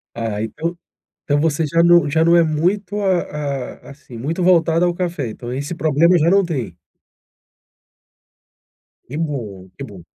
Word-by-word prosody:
Ah, 110 -2 -3
então 165 +10 -4 0.5
então 145 0 +1
você 160 0 +1
já 165 +3 +2
não 170 -3 +5
já 160 +2 +2
não 170 +1 +5
é 170 - +5
muito, 180 +6 -1
a 150 -8 -2
a - - -10
assim, 135 -4 -13
muito 160 +9 -3
voltada 170 -1 +3
ao 175 - +1
café, 170 -8 -3
então 120 +3 -7
esse 145 +6 -4
problema 160 +3 +3
já 160 +1 +3
não 195 +2 +4
tem. 125 - -4 2.3
Que 140 - -7
bom, 115 - -5
que 140 - -7
bom. 100 -7 -11
155 Hz, 160 wpm, -19 LUFS, 135-170 Hz, 2.3 s, não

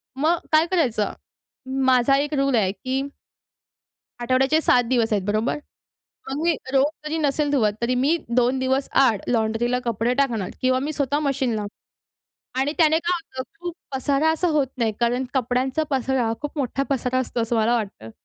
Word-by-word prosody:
मग 315 +6 +2
काय 310 +1 +5
करायचं? 245 - +1 0.7
माझा 260 +1 +4
एक 290 +2 -1
रूल 275 -2 +2
आहे 200 -5 +2
की 260 +6 -3 1.2
आठवड्याचे 260 +5 +2
7 245 -5 +4
दिवस 235 -4 +2
आहेत 200 -2 0
बरोबर? 215 +6 0 0.7
मग 280 +3 -3
मी 335 0 +3 0.2
रोज 270 0 +4 0.2
जरी 310 +1 -2
नसेल 295 -1 +1
धुवत 230 -8 +2
तरी 240 +2 +1
मी 275 +7 +2 0.2
2 250 +1 +3
दिवस 265 +1 0
आड 225 -7 +3
लॉन्ड्रीला 235 +1 +1
कपडे 235 +1 0
टाकणार 240 -8 0
किंवा 255 0 +3
मी 285 +4 -2
स्वतः 285 -1 0
मशीन 265 -4 0
लावनार 210 -1 -7 0.7
आणि 280 +3 0
त्याने 315 -1 +4
काय 345 +1 -1 0.2
होतं 260 - -1 0.2
खूप 350 0 -5 0.2
पसारा 280 +4 +1
असा 320 +3 0
होत 300 -4 +2
नाही. 230 -3 +1
कारण 245 +2 +1
कपड्यांचा 260 +3 0
पसारा 260 -3 0
खूप 295 +1 -5
मोठा 275 0 -1
पसारा 255 -1 0
असतो, 250 -2 -2
असं 230 +1 -1
मला 225 +2 +3
वाटतं. 195 - -5
260 Hz, 170 wpm, -23 LUFS, 235-285 Hz, 1.2 s, काय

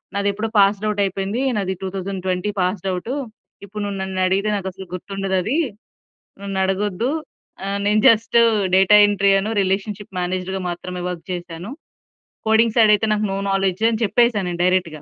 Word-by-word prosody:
నాది 200 0 +1
ఎప్పుడో 220 +2 -3
passed 200 +1 +3
out 210 -1 0
అయిపోయింది. 195 +5 -2 0.2
నాది 190 -1 -1
2020 190 0 -3
పాస్డ్ 185 +1 -1
అవుటూ. 185 +8 -4 0.5
ఇప్పుడు 210 +1 -7
నువ్వు 200 -1 -4
నన్ను 190 0 -4
అడిగితే 195 +3 +1
నాకు 190 -1 -5
అసలు 190 +1 -10
గుర్తుండదు 195 +1 -3
అదీ 260 - 0 0.8
నన్ను 195 -1 -4
అడగొ‌ద్దు 205 +4 -1 0.6
ఆహ్, 200 0 -2
నేను 210 +1 +3
జస్ట్ 230 +1 +4 0.4
డేటా 195 +2 +6
ఎంట్రీ 200 -1 +2
అను, 210 +3 -3
రిలేషన్‌షిప్ 195 +1 -3
మేనేజర్‌గా 185 +1 -2
మాత్రమే 180 +1 -5
వర్క్ 180 -2 -5
చేశాను. 175 +2 -6 0.8
కోడింగ్ 220 0 +4
సైడ్ 220 -3 +6
అయితే 220 - -1
నాకు 215 0 +1
నో 195 - -2
నాలెడ్జ్ 195 +1 0
అని 225 0 -2
చెప్పేసా 235 +1 +3
నేను 175 -1 -4
డైరెక్ట్‌గా. 180 -4 0
195 Hz, 160 wpm, -21 LUFS, 185-210 Hz, 0.8 s, డేటా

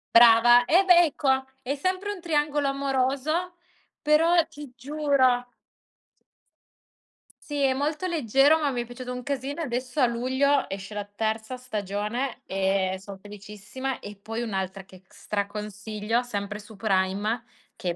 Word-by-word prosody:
Brava. 240 +1 +8
Eh 355 +9 +5
beh, 350 -2 +7
ecco, 290 -2 -1 0.3
è 270 +2 -2
sempre 370 +7 -2
un 405 - -6
triangolo 295 -3 0
amoroso, 275 +5 0 0.5
però, 325 +3 +4
ti 290 -5 -11
giuro 260 -2 +1 2.0
Sì, 290 -1 -4
è 265 -1 +3
molto 300 +6 -2
leggero, 295 - +3
ma 295 -2 +1
mi 245 -2 -2
è - - -12
piaciuto 250 +1 -8
un 250 0 -5
casino 280 +2 -3
e - - -1
adesso, 250 +3 -3
a 255 - +6
luglio, 260 +4 +1
esce 195 +2 -6
la 205 0 -3
terza 220 +4 -3
stagione, 215 +1 -3
e 190 0 0
son 195 0 -9
felicissima. 210 +6 -7
E 205 0 -9
poi 225 +4 -5
un'altra 190 -3 -3
che 185 -1 -16
c 190 - -36
stra 200 -1 -3
consiglio, 210 +2 -3
sempre 205 -3 -5
su 215 +1 -13
Prime, 200 +3 0 0.3
che 180 - -4
è 175 - -2
245 Hz, 150 wpm, -26 LUFS, 210-285 Hz, 2.0 s, Brava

